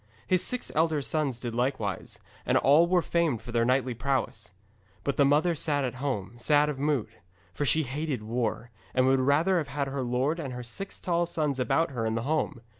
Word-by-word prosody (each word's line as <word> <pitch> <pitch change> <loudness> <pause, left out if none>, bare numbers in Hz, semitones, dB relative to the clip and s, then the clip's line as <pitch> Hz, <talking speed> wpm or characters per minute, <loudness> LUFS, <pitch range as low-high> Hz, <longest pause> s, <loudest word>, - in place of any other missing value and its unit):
His 185 -1 +2
six 250 -1 -2
elder 160 -1 +2
sons 140 -5 -1
did 120 -2 -5
likewise, 120 -5 -2 0.3
and - - +2
all 150 +5 +5
were 175 -1 +2
famed 165 -9 +1
for 120 - -8
their 115 -1 +2
knightly 130 0 +1
prowess. 135 -4 -2 0.5
But 140 - -1
the 140 - +4
mother 150 +5 +3
sat 145 -2 -1
at 125 - -2
home, 105 -8 -2
sad 150 +4 +3
of 140 -3 -4
mood. 145 -5 0 0.4
For 145 - -2
she 160 +3 +3
hated 140 -2 -3
war, 115 +1 -2 0.2
and 130 0 +4
would 135 0 +4
rather 155 +8 +3
have 150 - -3
had 140 0 -2
her 135 0 -3
lord 130 +6 0
and 135 -5 -4
her 125 0 -6
six 190 +12 -7
tall 175 -1 0
sons 150 -5 -1
about 140 +6 +1
her 120 -4 -3
in 110 - -1
the 115 - -2
home. 150 -4 -1
140 Hz, 205 wpm, -28 LUFS, 125-155 Hz, 0.5 s, all